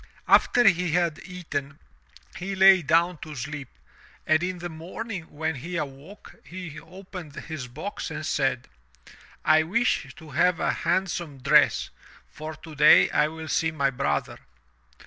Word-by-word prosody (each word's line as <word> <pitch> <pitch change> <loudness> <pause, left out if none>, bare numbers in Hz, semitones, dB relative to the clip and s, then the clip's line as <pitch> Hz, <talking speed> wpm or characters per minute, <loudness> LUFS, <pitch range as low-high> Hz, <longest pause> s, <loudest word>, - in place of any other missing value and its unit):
After 245 -3 +5
he 180 -3 +3
had 170 -3 +1
eaten, 145 -7 -5 0.6
he 195 +2 -4
lay 190 -1 +7
down 165 +2 +2
to 155 -1 -8
sleep, 140 +1 -6 0.6
and 155 +1 +3
in 180 +1 -2
the 175 0 -5
morning 175 +3 -7
when 160 +2 -3
he 170 +6 -5
awoke, 150 +6 -8
he 165 0 -8
opened 180 -2 -11
his 155 -6 -6
box 155 +12 -6
and 155 - -5
said; 130 -4 0 0.8
"I 155 0 +5
wish 175 - 0
to 160 -2 -13
have 170 +4 +2
a - - +1
handsome 170 -4 -2
dress, 125 - +3 0.4
for 155 +1 -8
today 155 -1 +5
I 150 - +3
will 160 0 -8
see 160 +1 +1
my 140 -4 0
brother." 75 - -2
160 Hz, 145 wpm, -26 LUFS, 145-180 Hz, 0.8 s, lay